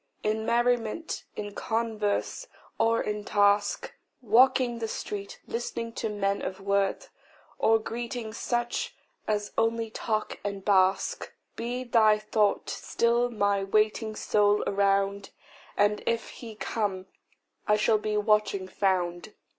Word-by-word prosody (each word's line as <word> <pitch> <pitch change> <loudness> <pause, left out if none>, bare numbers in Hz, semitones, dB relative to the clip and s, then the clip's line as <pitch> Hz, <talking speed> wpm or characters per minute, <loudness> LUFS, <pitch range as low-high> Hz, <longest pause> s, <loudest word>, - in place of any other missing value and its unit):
In 220 +1 -1
merriment, 240 +5 0
in 205 -1 -5
converse, 225 - -2 0.3
or 230 0 +3
in 210 0 -3
task, 205 0 +2 0.3
Walking 245 +1 +4
the 225 - -2
street, 200 -2 -5
listening 230 0 -4
to 225 - -3
men 200 -1 -1
of 190 - -4
worth, 200 0 0 0.5
Or 225 0 +5
greeting 235 0 -5
such 240 - -2 0.3
as 210 -1 -1
only 225 0 0
talk 215 -1 -2
and 200 -1 -4
bask, 190 -1 +2 0.2
Be 245 +2 -3
thy 220 -3 +4
thought 215 -1 +1
still 235 +1 +1
my 205 -3 +1
waiting 215 +2 +1
soul 205 -1 +2
around, 200 0 +1 0.5
And 205 0 +3
if 230 -1 0
He 225 -3 -10
come, 205 -3 -2 0.6
I 210 - +5
shall 215 +1 +3
be 210 0 -1
watching 210 -2 +2
found. 185 0 -1
215 Hz, 125 wpm, -28 LUFS, 200-230 Hz, 0.6 s, Or